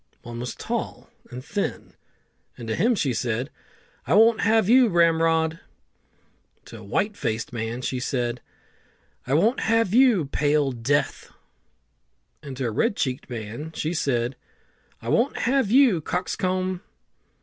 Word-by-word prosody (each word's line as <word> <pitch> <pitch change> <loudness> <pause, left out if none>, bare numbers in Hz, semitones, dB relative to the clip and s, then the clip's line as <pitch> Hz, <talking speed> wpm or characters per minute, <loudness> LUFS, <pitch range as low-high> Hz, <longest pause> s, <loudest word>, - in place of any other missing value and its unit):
One 120 0 -7
was 125 +1 -5
tall - - -5 0.2
and 125 +1 -9
thin, 205 0 -4 0.6
and 115 - -8
to 110 - -1
him 235 +6 +2
she 140 - 0
said, 120 +3 -2 0.6
"I - - +3
won't 225 +1 +5
have 220 -2 +3
you, 250 +2 +6
Ramrod!" 165 -2 +2 1.1
To 115 - -11
a - - -12
white 200 - -1
faced 115 - -3
man 115 +2 -4
she 130 0 -2
said, 125 -2 -2 0.9
"I 135 - +1
won't 220 - +2
have 225 -3 +1
you, 240 - +5
Pale 145 0 +1
Death;" 130 +4 -1 1.1
and 140 -3 -8
to 130 - -2
a 115 - -1
red 205 - 0
cheeked 130 0 -3
man 120 +7 -6
she 155 +3 -2
said, 125 -5 -1 0.7
"I - - -4
won't 240 +4 +1
have 260 -2 +1
you, 240 - +4
Cockscomb!" 185 +2 -2
155 Hz, 140 wpm, -24 LUFS, 125-205 Hz, 1.1 s, you